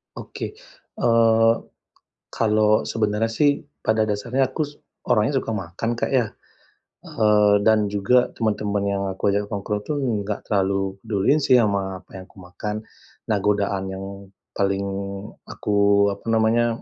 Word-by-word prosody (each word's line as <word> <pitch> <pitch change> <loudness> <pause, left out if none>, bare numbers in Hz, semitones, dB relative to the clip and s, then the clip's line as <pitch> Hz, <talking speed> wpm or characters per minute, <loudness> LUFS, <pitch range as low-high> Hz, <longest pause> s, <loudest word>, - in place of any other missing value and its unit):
Oke, - - -7 0.4
eee, 115 - +4 0.8
kalau 110 -1 +2
sebenarnya 110 0 0
sih 145 +3 +2 0.2
pada 110 0 +2
dasarnya 110 +6 0
aku - - -2
su 145 -1 -4 0.3
orangnya 110 +6 +3
suka - - -7
makan, 95 +3 -4
Kak, - - -2
ya, 120 -5 +2 0.8
eee, 105 -2 +3
dan 110 0 +3
juga 105 +5 +2
teman-teman 105 -2 -1
yang 100 0 -1
aku 95 - 0
ajak 100 +1 0
nongkrong 105 +1 -2
itu 150 - -2 0.3
gak 105 0 -3
terlalu 95 -1 0
peduliin 105 +8 +2
sih 135 -3 +2
sama 95 -3 -1
apa - - -13
yang 95 - -9
aku 100 - -24
makan. 95 +4 -5 0.5
Nah, 105 - +2
godaan 100 -2 +1
yang 95 0 -6 0.5
paling 100 0 0 0.6
aku, 100 0 +2
apa - - -24
namanya, 115 +1 +2
105 Hz, 140 wpm, -23 LUFS, 100-115 Hz, 0.8 s, eee